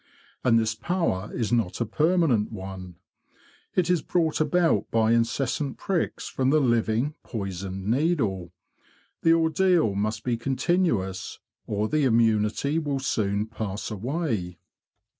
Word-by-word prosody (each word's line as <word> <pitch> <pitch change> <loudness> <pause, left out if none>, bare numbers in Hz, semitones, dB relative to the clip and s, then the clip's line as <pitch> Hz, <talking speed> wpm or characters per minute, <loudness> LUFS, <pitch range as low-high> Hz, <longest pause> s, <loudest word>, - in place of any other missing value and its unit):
And 115 -2 +4
this 110 -1 +1
power 110 - -1
is 115 -3 -2
not 110 -7 0
a 120 - +1
permanent 150 - +2
one. 95 -3 -8 0.8
It 180 -2 +2
is 180 -3 +2
brought 160 -2 0
about 170 +1 +2
by 110 0 +2
incessant 120 +4 0
pricks 190 -4 -2
from 130 0 0
the 155 +2 +4
living 120 +1 +1
poisoned 95 -3 -5
needle; 110 - 0 0.7
the 165 - +5
ordeal 165 - +3
must 105 +2 -2
be 120 -2 0
continuous, 125 - -1 0.3
or 105 +1 -1
the 155 +5 +1
immunity 115 +5 +2
will 145 -3 -2
soon 105 -6 0
pass 110 -2 -5
away. 110 - -3
115 Hz, 125 wpm, -26 LUFS, 105-155 Hz, 0.8 s, the